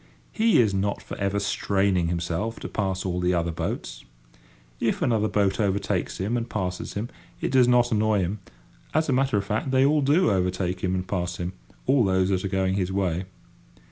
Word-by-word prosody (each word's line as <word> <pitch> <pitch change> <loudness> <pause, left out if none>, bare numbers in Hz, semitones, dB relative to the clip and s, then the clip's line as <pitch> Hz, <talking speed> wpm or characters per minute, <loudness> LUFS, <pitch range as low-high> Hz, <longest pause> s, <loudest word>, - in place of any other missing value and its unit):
He 225 - +3
is 110 -5 +3
not 100 +1 0
for - - -8
ever 100 0 0
straining 100 -3 +1
himself 85 +6 -2
to - - -4
pass 95 -2 -2
all 90 -1 -1
the 90 0 +1
other 85 0 0
boats. - - -4 0.8
If - - 0
another 110 -3 +2
boat 100 -1 +1
overtakes 100 -2 0
him 100 +6 -1
and 115 0 -4
passes 90 -1 -3
him 110 +4 -3 0.3
it - - -2
does 130 -2 +5
not 120 -1 +4
annoy 110 -2 +2
him; 95 +4 -2 0.6
as 155 -1 +2
a - - +3
matter 130 -3 +2
of 100 - -1
fact, 110 +5 -2
they 130 0 +4
all 150 +1 +3
do 150 - +3
overtake 90 -1 0
him 90 0 +1
and 90 0 -3
pass 90 -2 -2
him—all 95 +8 -1
those 95 -1 +2
that 95 -1 0
are - - 0
going 95 0 0
his 95 -1 -1
way. 95 -2 -1
100 Hz, 195 wpm, -25 LUFS, 90-115 Hz, 0.8 s, does